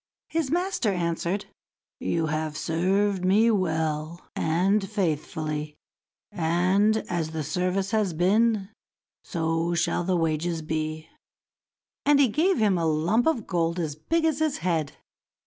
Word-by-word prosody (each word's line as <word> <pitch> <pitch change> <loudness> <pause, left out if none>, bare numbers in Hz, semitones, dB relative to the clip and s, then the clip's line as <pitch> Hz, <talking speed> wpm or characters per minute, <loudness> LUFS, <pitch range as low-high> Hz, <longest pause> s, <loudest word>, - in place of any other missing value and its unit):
His 320 -4 -1
master 350 - 0
answered, 170 +2 -1 0.5
"You 165 -1 0
have 155 0 -2
served 190 +3 +1
me 210 +5 +4
well 160 -4 -1
and 195 +5 +1
faithfully, 155 -5 -2 0.6
and 185 +6 +2
as 170 -3 -2
the 160 -1 -2
service 180 +6 -1
has 215 -4 +1
been, 205 +3 +2 0.5
so 165 0 -1
shall 170 +1 0
the 185 0 +1
wages 165 0 -1
be." 155 0 -3 1.0
And 290 0 +4
he 275 -4 +5
gave 340 - +2
him 200 -5 +2
a 165 - +1
lump 175 - +1
of 255 -10 +1
gold 170 -2 0
as 155 -4 -2
big 325 - 0
as 315 -2 +1
his 310 -2 +1
head. 160 -5 0
175 Hz, 130 wpm, -26 LUFS, 160-210 Hz, 1.0 s, he